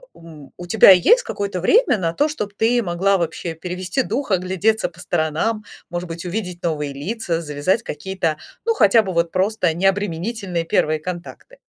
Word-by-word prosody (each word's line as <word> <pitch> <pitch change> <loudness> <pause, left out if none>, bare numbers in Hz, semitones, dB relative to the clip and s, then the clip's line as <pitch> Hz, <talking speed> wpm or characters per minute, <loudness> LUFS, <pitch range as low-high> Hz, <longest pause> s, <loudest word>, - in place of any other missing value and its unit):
м, 155 -4 -13
у 175 - -9
тебя 205 0 +7
есть 465 - +5
какое-то 200 - -4
время 335 - +3
на 165 -3 -1
то, 295 - +1
чтобы 210 -9 -5
ты 240 +2 +2
могла 190 +1 +1
вообще 170 0 -3
перевести 180 - -3
дух, 240 +1 -3
оглядеться 190 +4 +1
по 175 +1 -14
сторонам, 175 +7 -1 0.2
может 175 0 -4
быть, 170 +1 -7
увидеть 180 -2 -5
новые 150 -4 -2
лица, 170 +2 -3
завязать 150 +7 -1
какие-то, 165 -1 -3 0.3
ну, 460 - +2
хотя 225 - +5
бы 190 -3 -4
вот 170 -1 0
просто 185 -3 +1
необременительные 195 0 -1
первые 155 -1 +1
контакты? 180 - -8
180 Hz, 165 wpm, -20 LUFS, 170-215 Hz, 0.3 s, тебя